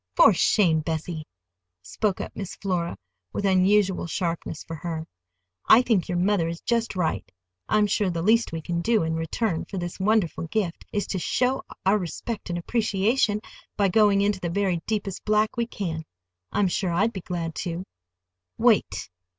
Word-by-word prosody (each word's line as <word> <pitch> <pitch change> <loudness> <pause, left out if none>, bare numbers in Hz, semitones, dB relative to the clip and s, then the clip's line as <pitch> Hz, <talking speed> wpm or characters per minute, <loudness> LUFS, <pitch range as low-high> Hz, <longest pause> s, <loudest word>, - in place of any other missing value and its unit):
"For 220 - +7
shame, 170 -3 +3
Bessie!" 160 0 -4 0.6
spoke 185 - -1
up - - -7
Miss 195 -3 -5
Flora, 180 -3 -2 0.4
with 200 - -2
unusual 190 -1 +3
sharpness 165 -2 -3
for 165 - -7
her. 160 0 -4 0.6
"I 235 +3 +8
think 215 -8 +1
your 175 - 0
mother 180 -2 +2
is 165 0 -4
just 230 -3 0
right. 165 - -1 0.4
I'm 215 -1 +4
sure 205 -1 +1
the 170 -2 -2
least 225 +4 +3
we 165 -1 -5
can 170 +1 -2
do 225 0 +2
in 160 0 -1
return 165 +3 -1
for 195 - -7
this 175 0 -4
wonderful 190 -5 +1
gift 180 -2 -2
is 205 - -1
to 190 - -3
show 255 +8 +1 0.2
our 200 +2 +4
respect 195 +4 -5
and 175 - -1
appreciation 210 +2 +1 0.4
by 200 -1 +3
going 205 0 +4
into 200 -1 +1
the 175 - -3
very 185 -2 0
deepest 205 -3 -2
black 215 0 +2
we 235 -1 0
can. 165 -8 -4 0.5
I'm 200 - +2
sure 185 +1 -1
I'd 205 +7 +1
be 190 - -5
glad 170 -2 -4
to." 175 0 -3 0.7
"Wait!" - - +2
190 Hz, 170 wpm, -25 LUFS, 170-210 Hz, 0.7 s, I